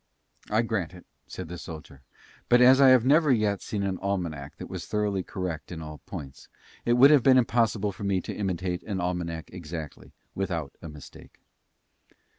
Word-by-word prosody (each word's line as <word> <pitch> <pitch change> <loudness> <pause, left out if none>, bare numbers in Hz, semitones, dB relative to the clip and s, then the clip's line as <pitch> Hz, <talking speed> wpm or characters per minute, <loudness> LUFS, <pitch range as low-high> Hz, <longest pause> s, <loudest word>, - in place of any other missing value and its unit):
"I 110 +2 +2
grant 100 -7 -2
it," 90 - -14 0.2
said - - -7
the 90 +1 -7
soldier, 75 -4 -10 0.5
"but 120 - +6
as 130 +2 +7
I 135 - +8
have 130 -2 +5
never 150 +2 +4
yet 105 -4 +1
seen 100 -2 -3
an 95 -2 -2
almanack 85 -8 -3
that - - -8
was - - -7
thoroughly 105 -2 0
correct 90 -4 -5
in 85 - -6
all 75 -2 -8
points, 70 -1 -9 0.4
it 120 - +3
would 130 +4 +7
have 145 -3 +6
been 130 +1 +5
impossible 115 -4 +1
for 100 +2 -10
me 100 -2 +1
to - - -6
imitate 90 -3 -2
an 100 -3 -4
almanack 85 -2 -3
exactly, 80 -4 -8 0.2
without, 85 -7 -3
a 80 - -8
mistake." 75 -2 -13
95 Hz, 180 wpm, -27 LUFS, 85-115 Hz, 0.5 s, I